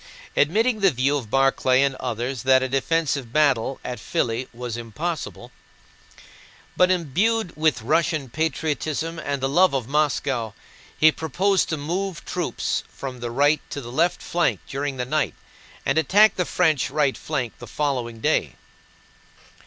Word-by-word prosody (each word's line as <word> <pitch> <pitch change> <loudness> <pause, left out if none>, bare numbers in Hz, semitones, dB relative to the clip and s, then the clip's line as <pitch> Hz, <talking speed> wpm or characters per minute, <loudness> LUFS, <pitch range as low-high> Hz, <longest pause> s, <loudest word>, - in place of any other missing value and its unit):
Admitting 220 - +2
the 195 -1 +5
view 135 0 +1
of 125 -7 -4
Barclay 135 0 +3
and 140 -1 +1
others 120 +2 -3
that 130 0 +4
a - - 0
defensive 135 -1 0
battle 135 -3 +2
at 125 -2 -4
Filí 115 +3 -1
was 120 -1 -5
impossible, 145 +8 -5 1.2
but 180 0 +4
imbued 185 - +1
with 155 -7 +1
Russian 155 +1 +1
patriotism 160 +3 -2
and 140 -3 -3
the - - +3
love 170 +2 +4
of 125 -4 -2
Moscow, 135 -6 0 0.4
he 155 0 +6
proposed 185 +6 0
to 160 - -1
move 175 +4 -3
troops - - -2
from 130 -2 -7
the 120 0 -4
right 145 +5 +2
to 145 - -5
the 120 -3 -8
left 170 +7 +1
flank 175 0 0
during 140 0 -3
the 125 - -2
night 150 +2 -1 0.5
and - - +2
attack 205 +8 +5
the 180 - 0
French 160 -6 +1
right 145 -1 +1
flank 130 -7 -3
the 120 - -9
following 120 -3 -2
day. - - +1
145 Hz, 150 wpm, -23 LUFS, 130-165 Hz, 1.2 s, he